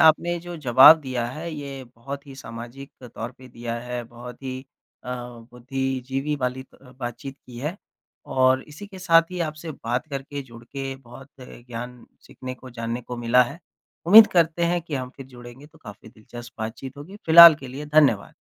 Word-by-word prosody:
आपने 170 +2 +4
जो 175 0 -8
जवाब 135 +3 +8
दिया 130 -4 -3
है 155 +7 -6
ये 140 -2 -7
बहुत 135 +4 -9
ही 135 - -11
सामाजिक 120 +2 -10 0.2
तौर 120 +3 -6
पे 130 0 -14
दिया 120 -1 -6
है, 125 0 -5
बहुत 120 +2 -12
ही 130 0 -5 0.4
अ, - - -9 0.4
बुद्धिजीवी 135 +3 -3
वाली 130 0 -3
त - - -26
अ, 125 -1 -16
बातचीत 130 +2 -7
की 120 -1 -11
है। 150 +8 -4 0.5
और 130 0 +2
इसी 185 +8 -10
के 195 -2 -12
साथ 165 -2 +5
ही 180 - -5
आपसे 155 0 -4
बात 125 +4 -3
करके, 140 +1 -5
जुड़ 115 -2 -14
के 135 +2 -6
बहुत 130 +1 -14
ज्ञान 120 -1 -9 0.2
सीखने 130 0 -8
को, 130 0 -13
जानने 115 0 -4
को 125 +1 -7
मिला 120 +1 +4
है। 125 +7 -6 0.5
उम्मीद 215 +4 +10
करते 170 -1 +2
हैं 175 +1 +1
कि 160 -3 -6
हम 130 -1 -4
फ़िर 135 - -10
जुड़ेंगे 120 +2 -13
तो 150 - -22
काफ़ी 105 +1 -12
दिलचस्प 120 +2 -12
बातचीत 120 +5 -6
होगी। 165 +8 -10
फ़िलहाल 165 0 +11
के 135 - -9
लिए 145 +4 -7
धन्यवाद। 145 -9 +3
130 Hz, 185 wpm, -24 LUFS, 120-150 Hz, 0.5 s, फ़िलहाल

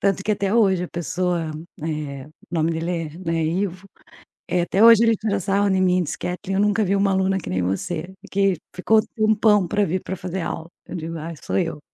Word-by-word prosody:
Tanto 195 -1 +1
que 210 - +2
até 200 0 0
hoje 190 -6 +3
a - - -7
pessoa, 175 0 -2 0.3
eh, 150 -4 -4
o - - -16 0.2
nome 165 -1 +1
dele 165 +2 -2
é, 165 -2 -4
né, 165 -2 -1
Ivo, 185 +3 -2 0.6
eh, 180 0 +2
até 190 +3 0
hoje 230 -1 +8
ele 230 -1 +4
tira 210 -2 -1
sarro 200 +2 +1
em 190 -1 +2
mim 180 -1 +3
e - - +1
diz: 155 - -4
"Katlyn, 180 +2 -4
eu 195 - +2
nunca 210 +1 +2
vi 195 +1 +1
uma 200 0 +2
aluna 190 0 +1
que 165 - -8
nem 90 0 0
você, 160 - -3 0.2
que 195 -1 +2 0.2
ficou 215 +4 +3
tempão 215 -3 +3
para 205 +4 +1
vir 185 +2 -1
para 190 - -4
fazer 180 +1 -4
aula", 165 0 -5 0.2
eu - - -7
digo: 165 -1 -5
"Ai, 165 +2 -6
sou - - -1
eu". 165 -4 -1
185 Hz, 225 wpm, -22 LUFS, 165-200 Hz, 0.6 s, hoje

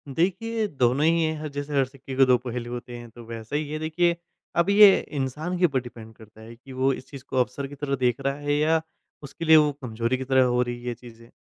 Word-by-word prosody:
देखिए, 215 +6 0
दोनों 135 -2 +1
ही 165 0 +3
हैं, 155 -1 -2
जैसे 145 +1 -5
हर 135 - +4
सिक्के 135 0 -10
के 135 0 +6
दो 125 -1 +4
पहलू 120 -1 -6
होते 120 0 -7
हैं 120 -1 -10
तो 120 +1 -13
वैसा 115 +3 -7
ही 150 -1 -2
है 155 - -3
देखिए 170 +2 +1 0.4
अब 170 +3 +3
ये 200 -1 +8 0.2
इंसान 150 +7 -3
के 180 - +5
ऊपर 135 -6 +1
डिपेंड 115 -2 -11
करता 110 0 -16
है 115 +1 -11
कि 130 +3 -15
वो 130 +1 +1
इस 130 - -9
चीज़ 140 -3 -10
को 130 - -3
अवसर 135 +2 -1
की 145 - -11
तरह 140 -1 -2
देख 125 -1 0
रहा 140 0 0
है 145 0 -1
या 160 +1 +2 0.4
उसके 145 +4 -7
लिए 160 0 +8
वो 150 -1 +4
कमज़ोरी 115 +1 -2
की 130 - -4
तरह 130 0 +3
हो 125 0 +2
रही 120 -1 -2
है, 120 - -10
ये 120 - -1
चीज़ें। 115 0 -15
135 Hz, 255 wpm, -25 LUFS, 120-155 Hz, 0.4 s, ये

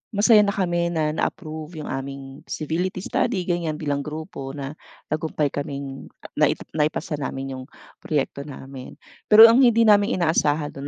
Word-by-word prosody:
masaya 215 +1 +6
na 200 -1 +2
kami 175 -3 0
na 160 -3 0
na-approve 155 0 -4
yung - - -7
aming 135 0 -7
feasibility 180 +4 -3
study 220 -7 -1
ganyan 170 -3 -2
bilang 145 -2 -2
grupo 150 -2 -7
na 140 0 -5 0.4
tagumpay 155 -2 -1
kaming 140 -1 -6 0.3
nai - - +4 0.2
naipasa 150 0 -1
namin 135 -1 -4
yung - - -8 0.4
proyekto 140 -1 -3
namin. 135 -2 -10 0.3
Pero 220 +2 +9
ang 240 - +4
hindi 235 -3 +5
namin 210 +1 +4
inaasahan 155 -3 +1
dun 140 - -6
155 Hz, 150 wpm, -23 LUFS, 140-180 Hz, 0.4 s, Pero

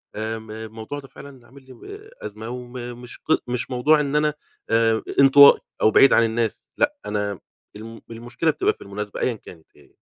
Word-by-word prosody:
آمم 110 0 -5
الموضوع 110 +5 -7
ده 135 - -13
فعلًا 140 - -12
اللي 130 -4 -17
عامل 135 +2 -17
لي 130 - -14
و 120 - -16 0.4
أزمة 110 +1 -8
وم 125 0 -8 0.3
مش 125 - -11
ق - - -6 0.2
مش 125 0 -3
موضوع 145 +5 +3
إن 145 -1 -2
أنا 150 0 +2 0.4
آآ 115 -1 +2 0.2
انطوائي 140 +1 +8 0.2
أو 110 - +4
بعيد 135 - +6
عن - - +5
الناس 115 -1 -3
لأ، 290 0 +1
أنا 105 -2 -3 0.4
الم 115 +2 -10
المشكلة 120 +8 -2
بتبقى - - 0
في - - -27
المناسبة 100 +1 -7
أيًا 125 - +1
كانت 85 -6 -16
هي. - - -22
120 Hz, 190 wpm, -22 LUFS, 110-135 Hz, 0.4 s, انطوائي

